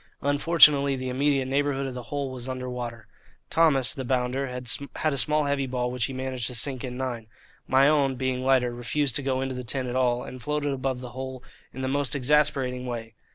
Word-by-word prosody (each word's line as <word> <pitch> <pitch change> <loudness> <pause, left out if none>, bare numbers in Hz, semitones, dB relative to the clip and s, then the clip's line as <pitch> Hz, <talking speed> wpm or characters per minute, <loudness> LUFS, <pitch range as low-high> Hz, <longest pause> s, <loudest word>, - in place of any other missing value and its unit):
Unfortunately 145 -1 +5
the 130 0 -4
immediate 135 +1 +1
neighbourhood 140 0 0
of 135 - -4
the 125 - -6
hole 140 -2 -3
was 130 0 -6
under 130 0 -4
water. 120 -3 -6 0.5
Thomas, 145 -6 +4
the 135 - -5
bounder, 130 +2 -1
had 125 +4 -1
a - - -2
small 150 +3 +2
heavy 140 -1 0
ball 125 -1 -2
which 125 -2 0
he - - -5
managed 130 -2 -2
to 125 - -3
sink 130 +1 0
in 125 -1 -5
nine. 120 -4 -4 0.4
My 135 +2 +5
own, 140 -3 +3
being 130 0 -2
lighter, 130 -2 +2
refused 125 +3 -1
to - - -3
go 130 -1 -1
into 135 0 -2
the 125 0 -5
tin 130 +2 -1
at 125 0 -4
all, 125 -1 +1
and 130 -1 -9
floated 145 +2 -1
above 130 -1 -2
the 125 - -7
hole 130 +1 -7 0.3
in 130 - -6
the - - 0
most 140 +1 0
exasperating 135 -2 +1
way. 115 -2 -5
130 Hz, 210 wpm, -26 LUFS, 125-140 Hz, 0.5 s, Unfortunately